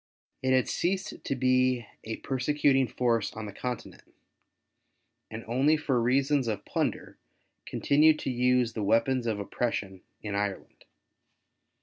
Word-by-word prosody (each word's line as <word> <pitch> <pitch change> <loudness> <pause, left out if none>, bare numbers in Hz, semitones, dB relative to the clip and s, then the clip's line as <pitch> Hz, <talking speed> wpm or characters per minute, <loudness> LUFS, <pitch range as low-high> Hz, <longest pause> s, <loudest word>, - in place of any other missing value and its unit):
It 130 - 0
had 130 -1 +3
ceased 190 +3 -2
to 135 - -2
be 130 -1 +2 0.2
a 110 0 -4
persecuting 135 0 +1
force 115 -2 0
on 110 0 -6
the 105 - -8
Continent, 125 +2 -7 1.1
and 110 +1 -8
only 135 +7 +3
for 135 -5 0
reasons 135 +2 +2
of 105 -2 -3
plunder - - -3 0.5
continued 155 +2 +4
to 135 - -2
use 125 -1 +2
the 110 - -4
Aveapons 115 +4 +2
of 110 -2 -1
oppression 100 -3 -3 0.2
in 105 -2 -4
Ireland. 100 -1 -4
125 Hz, 130 wpm, -28 LUFS, 110-135 Hz, 1.1 s, continued